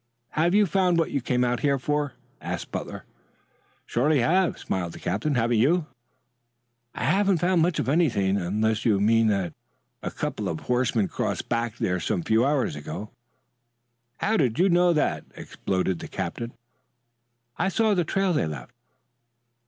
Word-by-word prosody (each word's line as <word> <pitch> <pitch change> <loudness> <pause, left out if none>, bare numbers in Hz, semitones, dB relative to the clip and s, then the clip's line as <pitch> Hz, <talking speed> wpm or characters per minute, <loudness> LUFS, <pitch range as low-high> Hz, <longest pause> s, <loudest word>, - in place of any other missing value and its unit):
"Have 170 +4 +2
you 210 0 +5
found 180 0 +2
what 165 - +1
you 140 - -1
came 125 +1 +1
out 120 -1 0
here 140 +2 +2
for?" 145 +1 -1 0.3
asked - - -5
Butler. - - -5 0.8
"Surely 135 +2 +2
I 160 - +2
have," 185 -1 +2
smiled 90 -3 -3
the - - -10
captain. 145 +8 -1
"Haven't 120 -1 +2
you?" 160 +7 +3 1.1
"I - - -4
haven't 195 +3 +3
found 175 +1 +2
much 170 0 +2
of - - -1
anything 130 - +2
unless 105 +4 0
you 105 -4 +3
mean 115 +2 +4
that 95 -5 0 0.5
a - - -3
couple - - -3
of 80 - -4
horsemen 125 -4 +1
crossed - - -3
back 115 -2 -1
there 90 0 0
some 85 +1 -1
few 110 +5 +3
hours 140 -1 +1
ago." 75 +8 -7 1.1
"How'd 145 - +1
you 185 +3 +4
know 175 0 +4
that?" 155 -3 0
exploded 95 -2 -2
the - - -7
captain. 95 +6 -4 1.1
"I 190 - +2
saw 220 +2 +2
the 180 -3 +2
trail 195 +2 0
they 115 - +1
left." 70 -6 -7
125 Hz, 160 wpm, -25 LUFS, 105-170 Hz, 1.1 s, you